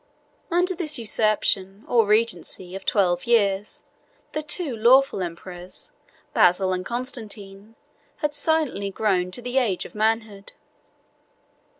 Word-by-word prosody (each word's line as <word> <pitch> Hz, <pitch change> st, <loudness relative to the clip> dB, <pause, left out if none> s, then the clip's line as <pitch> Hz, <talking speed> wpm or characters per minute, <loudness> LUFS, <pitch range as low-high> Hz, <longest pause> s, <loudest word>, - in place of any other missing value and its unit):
] -, -, -39 dB
Under 360 Hz, +2 st, +2 dB
this 310 Hz, -4 st, -2 dB
usurpation, 210 Hz, -3 st, 0 dB
or 230 Hz, -3 st, +3 dB
regency, 210 Hz, -4 st, 0 dB
of 195 Hz, -, -9 dB
twelve 180 Hz, -3 st, +2 dB
years, 205 Hz, -3 st, +1 dB, 0.5 s
the 305 Hz, -, -2 dB
two 305 Hz, -3 st, -1 dB
lawful 250 Hz, 0 st, +4 dB
emperors, 175 Hz, +1 st, -7 dB, 0.4 s
Basil 185 Hz, +1 st, +4 dB
and 185 Hz, 0 st, -2 dB
Constantine, 220 Hz, -3 st, -6 dB, 0.4 s
had 300 Hz, -2 st, -2 dB
silently 290 Hz, -9 st, +1 dB
grown 190 Hz, -3 st, 0 dB
to 235 Hz, +7 st, -7 dB
the 250 Hz, +2 st, +1 dB
age 210 Hz, -8 st, -1 dB
of -, -, -11 dB
manhood. 215 Hz, -2 st, -1 dB
215 Hz, 120 wpm, -24 LUFS, 195-245 Hz, 0.5 s, lawful